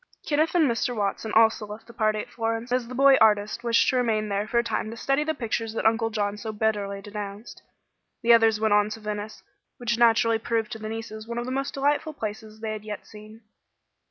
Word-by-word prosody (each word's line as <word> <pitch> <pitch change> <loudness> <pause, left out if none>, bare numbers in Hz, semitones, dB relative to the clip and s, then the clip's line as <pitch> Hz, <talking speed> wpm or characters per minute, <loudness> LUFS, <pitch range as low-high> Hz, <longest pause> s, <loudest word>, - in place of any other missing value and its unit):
Kenneth 310 +3 +1
and 325 -4 +5
Mr. 240 +1 -1
Watson 210 +1 -2
also 220 -1 +4
left 210 +2 -9
the 235 - -14
party 215 -1 +1
at - - -9
Florence, 225 +1 -3
as 250 -1 0
the 250 - -7
boy 275 +1 +6
artist 210 +1 +3
wished 230 -1 +3
to 260 - +1
remain 220 -3 0
there 200 +1 -1
for 235 - -1
a 235 - +4
time 225 -1 -2
to 230 - -8
study 275 +4 +1
the 315 +1 -2
pictures 225 -1 -3
that - - -3
Uncle 225 0 +3
John 205 -2 -2
so 220 +1 -5
bitterly 205 -2 -1
denounced. 205 +1 -8 0.6
The 235 0 +6
others 225 -2 +4
went 220 -1 +2
on 210 0 +3
to 215 - -6
Venice, 210 0 -6 0.3
which 235 -1 -1
naturally 230 -1 +4
proved 225 -1 -1
to 220 - -6
the 215 0 -6
nieces 220 -1 -7
one 235 0 -5
of 240 - -2
the 255 - -4
most 275 +2 -2
delightful 290 +3 0
places 215 -3 -7
they 220 -1 -3
had 215 -1 -6
yet 210 -2 -7
seen. 215 +1 -13
225 Hz, 225 wpm, -25 LUFS, 215-235 Hz, 0.6 s, boy